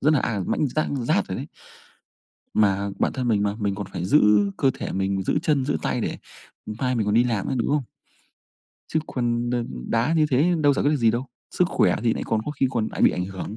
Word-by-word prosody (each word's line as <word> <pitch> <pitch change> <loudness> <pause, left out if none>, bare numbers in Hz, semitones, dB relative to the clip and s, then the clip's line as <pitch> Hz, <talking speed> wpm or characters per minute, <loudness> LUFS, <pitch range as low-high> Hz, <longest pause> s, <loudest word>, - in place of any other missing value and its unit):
rất 150 +3 +3
là, 140 - +2
à, 110 -4 -1
mãnh 150 - +1
rát 155 +5 -1 0.2
rát - - +2
rồi - - -3
đấy. - - -5 1.1
Mà 100 -1 +2
bản - - +1
thân 125 -2 -2
mình 105 -3 +2
mà 100 0 0
mình 100 -1 0
còn 100 -1 -5
phải 85 - -4
giữ 125 +11 +4 0.4
cơ 135 - +3
thể - - -5
mình, 95 0 -1
giữ - - 0
chân, 145 -4 +1
giữ 145 - 0
tay - - -1
để, - - -3 0.5
ừm, 105 0 -6
mai 130 -1 0
mình 110 -4 0
còn 105 - +1
đi 120 +2 +5
làm 115 -5 -1
nữa, 135 - -1
đúng 115 - 0
không? 145 -2 +1 1.1
Chứ 160 - +2
còn, 120 -1 -1
ờ, 120 -1 0 0.2
đá 115 +7 +1
như 155 -1 +4
thế 150 +7 +3
đâu 145 -1 +4
giải - - 0
quyết 145 - +4
được 150 - +2
gì 115 -4 +3
đâu, 120 +4 -2 0.2
sức 180 - +2
khỏe - - +2
thì 115 - +3
nại - - -4
còn 110 - 0
có - - -3
khi 135 -2 0
còn 115 -4 -1
lại - - -3
bị - - +7
ảnh 90 - -2
hưởng. 95 +3 -6
120 Hz, 255 wpm, -24 LUFS, 105-140 Hz, 1.1 s, bị